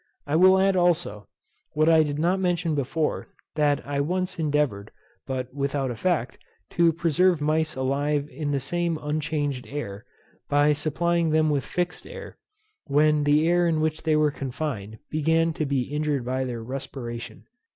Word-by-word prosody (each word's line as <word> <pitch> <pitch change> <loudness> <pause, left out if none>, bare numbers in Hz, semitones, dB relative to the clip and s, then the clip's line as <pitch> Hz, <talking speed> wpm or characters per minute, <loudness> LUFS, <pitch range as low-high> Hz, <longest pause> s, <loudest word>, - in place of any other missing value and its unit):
I 145 - -1
will 185 +3 +6
add, 195 0 +3
also, 175 - +1 0.5
what 155 +1 +2
I 160 -1 +6
did 145 -2 -1
not 175 +5 +1
mention 175 -3 0
before, 150 +2 -1 0.3
that 145 -2 +1
I 140 0 -1
once 180 +3 -2
endeavoured, 145 -10 0 0.4
but 130 -1 -4
without 140 -1 -1
effect, 165 +9 -1 0.3
to 170 -1 +4
preserve 170 +1 +2
mice 155 +1 0
alive 140 +2 0
in 145 +3 -4
the 140 -1 0
same 170 +4 -1
unchanged 150 -3 -2
air, 115 -7 -6 0.4
by 145 +1 +4
supplying 170 +3 0
them 155 0 +3
with 140 -2 0
fixed 180 0 -3
air, 485 0 -10 0.5
when 150 +1 +3
the 150 +2 +3
air 175 0 +3
in 160 -2 +1
which 155 0 -1
they 160 -1 +1
were 150 -1 +3
confined 130 -6 -5
began 160 +2 +2
to 155 -1 -2
be 135 -2 +1
injured 145 -1 -2
by 130 +1 -1
their 120 -3 -5
respiration. 120 -2 -6
150 Hz, 160 wpm, -25 LUFS, 140-165 Hz, 0.5 s, will